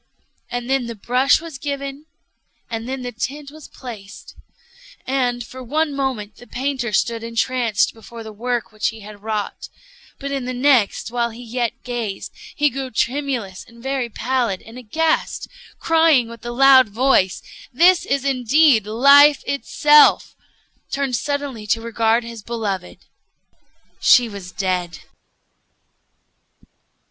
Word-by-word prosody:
And 245 Hz, 0 st, -4 dB
then 265 Hz, -2 st, 0 dB
the 235 Hz, -, -6 dB
brush 250 Hz, +6 st, +2 dB
was 320 Hz, -5 st, -9 dB
given, 280 Hz, +1 st, -5 dB, 0.6 s
and 225 Hz, +1 st, -4 dB
then 265 Hz, -1 st, -4 dB
the 245 Hz, -, -4 dB
tint 280 Hz, +5 st, -5 dB
was 310 Hz, -1 st, -12 dB
placed; 210 Hz, -6 st, -11 dB, 0.7 s
and, 250 Hz, -2 st, 0 dB
for 255 Hz, +3 st, -11 dB
one 300 Hz, +4 st, -1 dB
moment, 240 Hz, -7 st, -3 dB
the 245 Hz, -, -15 dB
painter 260 Hz, -2 st, -3 dB
stood 225 Hz, +3 st, 0 dB
entranced 230 Hz, -1 st, 0 dB
before 230 Hz, +1 st, -11 dB
the 220 Hz, -1 st, -9 dB
work 240 Hz, +2 st, -3 dB
which 215 Hz, 0 st, -1 dB
he 225 Hz, 0 st, -5 dB
had 205 Hz, 0 st, -12 dB
wrought; 215 Hz, -1 st, -4 dB, 0.5 s
but 280 Hz, 0 st, -6 dB
in 270 Hz, -2 st, -3 dB
the 255 Hz, 0 st, -4 dB
next, 250 Hz, -5 st, +2 dB
while 235 Hz, -1 st, 0 dB
he 235 Hz, +2 st, -11 dB
yet 240 Hz, 0 st, -3 dB
gazed, 235 Hz, -5 st, -4 dB, 0.2 s
he 295 Hz, -1 st, +2 dB
grew 265 Hz, 0 st, -4 dB
tremulous 245 Hz, -6 st, -2 dB
and 235 Hz, +1 st, -17 dB
very 265 Hz, -3 st, -2 dB
pallid, 235 Hz, -4 st, -1 dB
and 230 Hz, +3 st, -11 dB
aghast, 315 Hz, +8 st, -1 dB
and -, -, -21 dB
crying 320 Hz, -7 st, +3 dB
with 230 Hz, -1 st, -11 dB
a -, -, -3 dB
loud 260 Hz, -1 st, +6 dB
voice, 215 Hz, -4 st, +2 dB, 0.3 s
'This 345 Hz, +7 st, +4 dB
is 275 Hz, 0 st, 0 dB
indeed 265 Hz, -3 st, +3 dB
Life 280 Hz, +6 st, +6 dB
itself!' 295 Hz, +1 st, +4 dB, 0.5 s
turned 275 Hz, -2 st, -1 dB
suddenly 280 Hz, -4 st, -3 dB
to 225 Hz, -, +1 dB
regard 230 Hz, 0 st, +1 dB
his 230 Hz, -1 st, -8 dB
beloved:—She 220 Hz, +3 st, -2 dB
was 200 Hz, -4 st, -9 dB
dead!" 180 Hz, -3 st, -2 dB
245 Hz, 135 wpm, -20 LUFS, 225-275 Hz, 0.7 s, loud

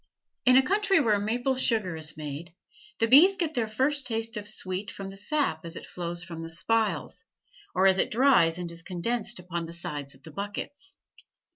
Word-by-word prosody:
In 255 Hz, 0 st, +8 dB
a 265 Hz, -, +6 dB
country 395 Hz, +2 st, +3 dB
where 215 Hz, -8 st, +3 dB
maple 245 Hz, +6 st, 0 dB
sugar 220 Hz, -9 st, 0 dB
is 155 Hz, -1 st, -4 dB
made, 155 Hz, +3 st, -7 dB, 0.4 s
the 225 Hz, -, +3 dB
bees 305 Hz, +12 st, +7 dB
get 335 Hz, -4 st, -1 dB
their 240 Hz, -5 st, 0 dB
first 270 Hz, +6 st, 0 dB
taste 225 Hz, -1 st, -2 dB
of 205 Hz, -1 st, -5 dB
sweet 190 Hz, -1 st, -4 dB
from 195 Hz, -1 st, -7 dB
the -, -, -11 dB
sap 210 Hz, -, -1 dB
as 170 Hz, 0 st, -6 dB
it -, -, -7 dB
flows 175 Hz, 0 st, -5 dB
from 165 Hz, -2 st, -7 dB
the 165 Hz, -, -6 dB
spiles, 220 Hz, +7 st, 0 dB, 0.5 s
or 185 Hz, +1 st, +3 dB
as 190 Hz, 0 st, +5 dB
it -, -, +2 dB
dries 220 Hz, -10 st, +4 dB
and 175 Hz, -1 st, -5 dB
is 170 Hz, 0 st, -10 dB
condensed 205 Hz, +7 st, -3 dB
upon 175 Hz, -2 st, -4 dB
the 165 Hz, -, -9 dB
sides 145 Hz, -5 st, -5 dB
of 130 Hz, -, -22 dB
the 160 Hz, -, -11 dB
buckets. 205 Hz, -, -6 dB
200 Hz, 195 wpm, -28 LUFS, 170-245 Hz, 0.5 s, In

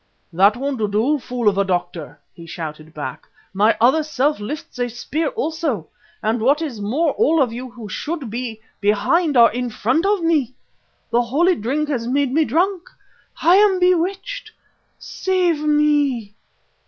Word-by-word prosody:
"That 200 Hz, +6 st, +4 dB
won't 275 Hz, -1 st, -3 dB
do, 250 Hz, +9 st, +1 dB
fool 245 Hz, -3 st, -3 dB
of 200 Hz, -1 st, +3 dB
a -, -, +4 dB
doctor," 175 Hz, -5 st, -3 dB
he 170 Hz, -1 st, -12 dB
shouted 155 Hz, -1 st, -7 dB
back. 145 Hz, -5 st, -7 dB, 0.3 s
"My 210 Hz, +3 st, +3 dB
other 260 Hz, +7 st, +4 dB
self 295 Hz, -2 st, 0 dB
lifts 270 Hz, +5 st, -7 dB
a 245 Hz, 0 st, 0 dB
spear 280 Hz, +7 st, -3 dB
also, 320 Hz, -, -3 dB, 0.3 s
and 220 Hz, +2 st, 0 dB
what 280 Hz, +6 st, +3 dB
is 275 Hz, -10 st, -5 dB
more 285 Hz, +10 st, +1 dB
all 330 Hz, -7 st, +2 dB
of 250 Hz, -5 st, +1 dB
you 255 Hz, +2 st, -6 dB
who 235 Hz, -3 st, -10 dB
should 280 Hz, -, -5 dB
be 230 Hz, -2 st, -5 dB, 0.2 s
behind 270 Hz, -, +2 dB
are 235 Hz, -1 st, +7 dB
in 245 Hz, +2 st, -3 dB
front 255 Hz, -, 0 dB
of 405 Hz, -4 st, +1 dB
me. 295 Hz, -7 st, +1 dB, 0.6 s
The 235 Hz, +1 st, +3 dB
holy 300 Hz, +10 st, +2 dB
drink 295 Hz, +3 st, -2 dB
has 240 Hz, -5 st, -2 dB
made 270 Hz, 0 st, 0 dB
me 315 Hz, +1 st, +3 dB
drunk; 355 Hz, -, 0 dB, 0.5 s
I 345 Hz, +4 st, +6 dB
am 400 Hz, -2 st, +4 dB
bewitched. 365 Hz, +7 st, 0 dB, 0.5 s
Save 365 Hz, -4 st, 0 dB
me!" 295 Hz, -7 st, +1 dB
260 Hz, 160 wpm, -20 LUFS, 220-320 Hz, 0.6 s, are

